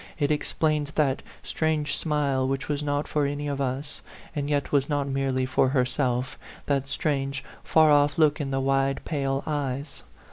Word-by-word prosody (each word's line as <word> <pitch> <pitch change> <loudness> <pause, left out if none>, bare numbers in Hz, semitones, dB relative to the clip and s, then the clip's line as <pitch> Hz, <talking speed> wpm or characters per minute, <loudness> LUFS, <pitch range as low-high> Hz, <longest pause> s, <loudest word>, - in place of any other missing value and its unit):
It 145 -1 +1
explained 150 -1 0
that 140 -4 +2 0.2
strange 155 -2 0
smile 140 -4 0
which 135 0 -2
was 145 -1 -1
not 145 0 -1
for 150 -2 +1
any 145 +1 -3
of 140 -1 -2
us, 140 +3 -3 0.3
and 145 -1 -2
yet 145 -2 0
was 140 0 +2
not 145 -2 0
merely 135 -1 0
for 130 0 +2
herself, 130 -1 0 0.3
that 140 -1 0
strange, 140 -3 -1 0.2
far 155 -1 +5
off 145 0 +4
look 155 -1 +3
in 140 - -3
the 135 0 0
wide, 135 0 +1
pale 135 -3 -1
eyes. 140 -2 -3
140 Hz, 170 wpm, -26 LUFS, 135-150 Hz, 0.3 s, far